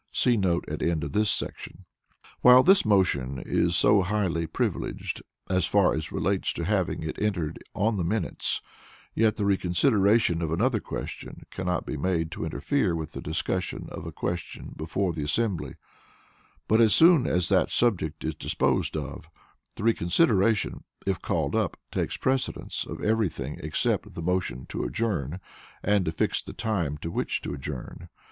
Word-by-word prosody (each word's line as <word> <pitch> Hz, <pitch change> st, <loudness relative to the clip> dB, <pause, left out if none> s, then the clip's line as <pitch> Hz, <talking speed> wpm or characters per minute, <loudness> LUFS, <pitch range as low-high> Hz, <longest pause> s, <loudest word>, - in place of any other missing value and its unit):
[See 125 Hz, -, +3 dB
note 90 Hz, -5 st, +1 dB
at -, -, -4 dB
end 85 Hz, -3 st, 0 dB
of 75 Hz, -, -4 dB
this 105 Hz, +4 st, +2 dB
section.] 95 Hz, -, -4 dB, 0.6 s
While 125 Hz, +1 st, +8 dB
this 190 Hz, +4 st, +5 dB
motion 75 Hz, -11 st, +2 dB
is 85 Hz, 0 st, +1 dB
so 100 Hz, +4 st, +5 dB
highly 90 Hz, -4 st, 0 dB
privileged 80 Hz, -, -3 dB, 0.3 s
as 95 Hz, -3 st, +1 dB
far 100 Hz, -3 st, +3 dB
as 80 Hz, +2 st, -3 dB
relates 100 Hz, -1 st, 0 dB
to 85 Hz, -, -3 dB
having 95 Hz, -3 st, 0 dB
it 80 Hz, -, -5 dB
entered 90 Hz, -8 st, -1 dB
on 105 Hz, +2 st, +1 dB
the 90 Hz, -, 0 dB
minutes, 95 Hz, +3 st, -1 dB, 0.5 s
yet 110 Hz, -1 st, +2 dB
the 105 Hz, -, -1 dB
reconsideration 100 Hz, 0 st, +3 dB
of 80 Hz, -2 st, -2 dB
another 110 Hz, +7 st, +1 dB
question -, -, -7 dB
cannot 90 Hz, -2 st, -2 dB
be -, -, -4 dB
made 80 Hz, +1 st, 0 dB
to -, -, -5 dB
interfere 90 Hz, -, 0 dB
with 80 Hz, -1 st, -4 dB
the -, -, -7 dB
discussion 90 Hz, +3 st, -3 dB
of -, -, -7 dB
a -, -, -5 dB
question 85 Hz, 0 st, -5 dB
before 85 Hz, +4 st, -1 dB
the 80 Hz, -, -4 dB
assembly, 95 Hz, +5 st, -1 dB, 0.9 s
but 110 Hz, +2 st, +4 dB
as 110 Hz, -2 st, +5 dB
soon 165 Hz, -5 st, +6 dB
as 90 Hz, -1 st, +1 dB
that -, -, +3 dB
subject 90 Hz, -10 st, +1 dB
is 80 Hz, -, -1 dB
disposed 80 Hz, -, 0 dB
of, 75 Hz, +1 st, -6 dB, 0.5 s
the -, -, -6 dB
reconsideration, 110 Hz, -, +2 dB, 0.2 s
if 95 Hz, -2 st, -1 dB
called -, -, -1 dB
up, -, -, 0 dB
takes -, -, -2 dB
precedence 130 Hz, -1 st, -2 dB
of -, -, -7 dB
every 110 Hz, -2 st, +2 dB
thing 70 Hz, -2 st, -6 dB
except 75 Hz, -, -1 dB
the 85 Hz, -, -5 dB
motions 90 Hz, -8 st, -1 dB
to -, -, -3 dB
adjourn, 85 Hz, -, -2 dB, 0.4 s
and 100 Hz, -1 st, +2 dB
to 80 Hz, -, 0 dB
fix 80 Hz, -, 0 dB
the -, -, -9 dB
time 90 Hz, -10 st, -1 dB
to 85 Hz, +2 st, -5 dB
which -, -, -1 dB
to -, -, -4 dB
adjourn. 70 Hz, -2 st, -7 dB
90 Hz, 165 wpm, -27 LUFS, 80-105 Hz, 0.9 s, While